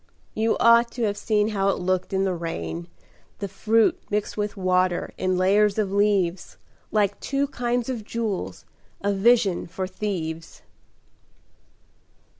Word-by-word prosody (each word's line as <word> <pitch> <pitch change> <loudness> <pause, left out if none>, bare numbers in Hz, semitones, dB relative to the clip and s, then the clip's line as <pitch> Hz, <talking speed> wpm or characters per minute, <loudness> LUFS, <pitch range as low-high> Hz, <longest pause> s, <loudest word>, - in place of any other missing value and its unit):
You 220 +1 +1
ought 235 0 +5
to 240 - -3
have 205 -2 +1
seen 210 0 +1
how 195 -2 +1
it - - +1
looked 185 0 -1
in 190 0 +1
the 190 -1 0
rain, 85 - -5 0.5
The 200 - -4
fruit 220 +3 +2
mixed 210 0 -2
with 210 0 -3
water 185 -1 +1
in 185 -1 0
layers 200 +3 +3
of 205 -3 0
leaves, 195 -3 +1 0.3
Like 205 -2 +1
two 275 0 0
kinds 245 -3 -2
of 245 -4 -3
jewels, 220 -3 -4 0.4
a 200 0 +1
vision 200 -2 +3
for 185 +2 -4
thieves." 175 -4 -5
200 Hz, 140 wpm, -24 LUFS, 185-220 Hz, 0.5 s, ought